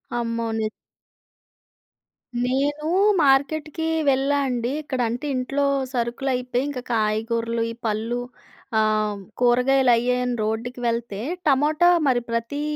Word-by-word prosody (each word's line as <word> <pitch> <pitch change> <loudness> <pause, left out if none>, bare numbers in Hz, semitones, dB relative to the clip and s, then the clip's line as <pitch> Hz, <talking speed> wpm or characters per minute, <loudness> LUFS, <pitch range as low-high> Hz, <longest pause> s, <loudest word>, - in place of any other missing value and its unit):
అమ్మోని 230 -2 -1 1.8
నేనూ 290 +4 0 0.4
మార్కెట్‌కీ 300 +3 +1 0.2
వెళ్ళా 275 +2 +2
అండి. 245 -1 -1
ఇక్కడంటే, 245 -2 -2
ఇంట్లో 275 +3 0 0.3
సరుకులయిపోయి, 250 +1 -1
ఇంక 270 -3 -4
కాయగూరలు, 230 +2 0
ఈ - - -6
పళ్ళు 225 +3 -1 0.6
ఆహ్, 215 -1 +1 0.2
కూరగాయలయ్యాయని 250 0 +3
రోడ్డుకి 230 +3 -3
వెళ్తే, 230 -3 -2 0.3
టమోటా 300 +5 +4 0.2
మరి 250 -2 +3
ప్రతీ 230 +5 -2
245 Hz, 90 wpm, -23 LUFS, 230-270 Hz, 1.8 s, టమోటా